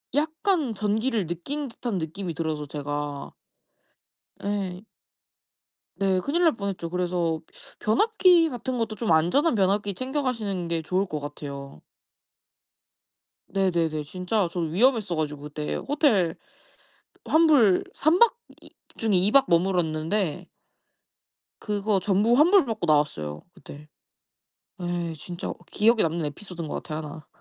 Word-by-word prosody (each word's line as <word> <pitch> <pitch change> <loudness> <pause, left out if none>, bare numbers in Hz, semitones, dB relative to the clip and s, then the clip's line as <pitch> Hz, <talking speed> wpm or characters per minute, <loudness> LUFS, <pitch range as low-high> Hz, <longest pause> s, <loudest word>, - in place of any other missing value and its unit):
약간 315 - +1
전기를 215 0 0
느낀 275 - -4
듯한 230 -3 -4
느낌이 170 +2 -4
들어서 155 -2 -3
제가. 145 0 -5 1.1
예. 195 -3 -2 1.1
네. 195 -1 +1
큰일 330 - 0
날 325 -6 +4
뻔 200 -2 -3
했죠. 175 -3 -5
그래서 175 -2 -1 0.4
변압기 355 - +4
같은 250 -1 -4
것도 225 -2 -2
좀 220 -3 -1
안전한 180 - +3
변압기 200 +1 +1
챙겨 265 +7 -2
가시는 210 -9 -2
게 170 -1 -1
좋을 185 +5 0
것 155 -5 -4
같아요. 140 - -8 1.7
네네네. 170 -5 0
진짜 180 +5 -1
저 180 - -4
위험했어 200 - +2
가지고 150 -2 -3
그때 150 0 -4
호텔 235 - +1 0.9
환불 295 - +5
3 310 +5 +3
박 470 0 +6 0.3
이 - - -13 0.3
중에 220 -3 +1
2 190 +4 +2
박 275 +2 +6
머물렀는데 170 0 0 1.1
그거 210 -1 0
전부 205 +4 +2
환불받고 285 - +4
나왔어요 145 - 0
그때. 145 +2 -12 1.0
예. 175 -1 -2
진짜 175 +3 -7
어 - - -4 0.2
기억에 225 +1 +3
남는 165 0 0
에피소드인 170 +2 -7
것 - - -4
같아요 155 -2 -5
1. 150 0 -8
190 Hz, 250 characters per minute, -25 LUFS, 160-230 Hz, 1.7 s, 박